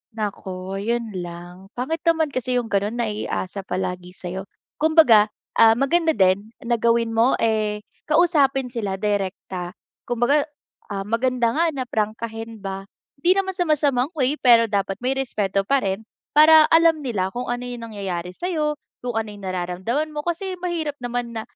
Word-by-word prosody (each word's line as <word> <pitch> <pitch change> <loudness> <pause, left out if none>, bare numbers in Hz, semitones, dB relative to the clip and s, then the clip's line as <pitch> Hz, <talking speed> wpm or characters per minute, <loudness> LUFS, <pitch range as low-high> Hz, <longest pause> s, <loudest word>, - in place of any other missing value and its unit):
Naku 195 -3 -4
yun 230 +2 -2
lang, 175 +2 -9
pangit 285 +7 -2
naman 320 -3 +3
kasi 255 -1 -1
yung 240 -2 -1
ganon 205 +3 0
naiasa 210 -4 -3
palagi 180 -1 -4
sa'yo. 190 +2 -6 0.3
Kumbaga, 300 -9 +6 0.3
ah, 225 0 +7
maganda 320 +6 +2
din 190 +1 +3 0.2
na 235 -1 0
gawin 230 0 +2
mo 230 +3 +3
eh 215 -2 0 0.2
kausapin 290 -5 +3
sila 210 -6 -2
direkta 190 -2 -3 0.3
kumbaga, 245 +5 +2 0.4
ah, 195 -2 -4
maganda 235 +3 +1
nga 325 +7 +2
na 260 - -2
prangkahin 225 -1 -4
ba 195 0 -5 0.3
hindi 345 +6 +4
naman 390 -1 0
sa 355 - +1
masamang 285 -1 +1
way 280 0 +1
pero 230 -3 +5
dapat 195 -1 0
may 255 - +1
respeto 200 -7 -1
pa 275 +5 +2
rin, 195 +3 -2 0.3
para 310 0 +8
alam 325 -1 +5
nila 195 -8 -2
kung 245 0 -4
ano 245 +1 -2
yung 240 -2 -6
nangyayari 185 -4 -4
sa'yo, 305 - -2 0.2
kung 245 -2 -3
ano 225 -1 -1
yung 205 - -12
nararamdaman 185 - -2
mo 295 - -3
kasi 345 +4 -3
mahirap 335 -4 -2
naman 245 -1 -3
na 225 - -3
230 Hz, 160 wpm, -22 LUFS, 200-280 Hz, 0.4 s, para